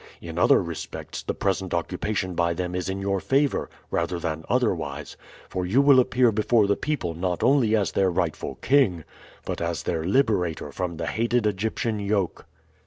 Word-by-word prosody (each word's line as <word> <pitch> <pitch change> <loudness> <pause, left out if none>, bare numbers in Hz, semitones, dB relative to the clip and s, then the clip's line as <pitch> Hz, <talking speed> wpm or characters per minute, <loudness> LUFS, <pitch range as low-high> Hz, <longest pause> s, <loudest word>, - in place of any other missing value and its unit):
In 85 0 -6
other 90 - +5
respects 85 -2 -6
the - - -3
present 95 -2 -1
occupation 95 +2 -2
by 85 -1 +1
them 90 0 -3
is 90 0 -2
in 95 +1 -3
your 100 0 0
favor 140 +6 +1 0.2
rather 90 - -1
than 80 -2 -3
otherwise, 80 - -1 0.3
for 90 - -3
you 95 +9 +2
will 140 -2 +7
appear 125 -1 +3
before 110 +1 +3
the 100 0 +2
people 145 - -2
not 90 +1 -2
only 125 -5 +4
as 105 -3 +1
their 95 -1 +2
rightful 85 -3 -2
king 115 - +3 0.4
but - - -4
as 85 -1 -2
their 80 -2 -1
liberator 90 - +1
from 85 +1 -4
the 85 - -3
hated 115 +4 0
Egyptian 105 +2 -1
yoke." 100 -3 -1
95 Hz, 175 wpm, -25 LUFS, 85-110 Hz, 0.4 s, will